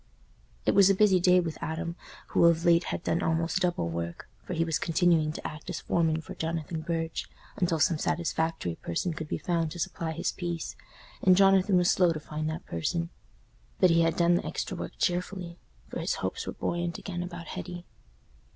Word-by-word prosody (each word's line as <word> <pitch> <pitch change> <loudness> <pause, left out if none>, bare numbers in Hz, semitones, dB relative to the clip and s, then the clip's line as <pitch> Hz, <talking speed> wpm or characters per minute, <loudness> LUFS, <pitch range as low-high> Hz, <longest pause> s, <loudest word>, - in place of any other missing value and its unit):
It - - +3
was 200 -1 +7
a 195 - +4
busy 195 -2 +5
day 180 +1 +5
with 165 -3 -3
Adam, 170 +2 -3 0.3
who - - +4
of 170 0 +4
late 170 0 +5
had - - -3
done 170 - 0
almost 165 +1 +1
double 175 - 0
work, 85 0 -5 0.2
for 180 - -4
he 165 - +2
was 160 -2 0
continuing 165 -2 +2
to - - -8
act 155 - -9
as - - -4
foreman 160 -2 +1
for - - -9
Jonathan 160 0 -3
Burge, 165 0 -3 0.3
until 170 -3 +1
some 160 +1 +3
satisfactory 160 - -1
person 125 - -2
could 155 0 -6
be - - -2
found 165 -2 0
to 175 +2 -8
supply 165 0 -2
his 160 - -1
place, 170 -2 -4 0.5
and 185 -1 +5
Jonathan 195 0 +5
was 180 0 +4
slow 180 -3 +4
to 155 - -5
find 155 +1 -4
that 160 +2 -5
person. 170 - -2 0.7
But 185 -2 +6
he 165 0 +5
had 165 0 +2
done 170 0 +4
the 175 - +1
extra - - -3
work - - -6
cheerfully, 180 -1 -2 0.3
for - - -5
his - - -1
hopes - - -3
were - - -3
buoyant 175 -1 -2
again 175 -3 -5
about 175 -2 -7
Hetty. 180 -1 -6
170 Hz, 195 wpm, -28 LUFS, 160-180 Hz, 0.7 s, was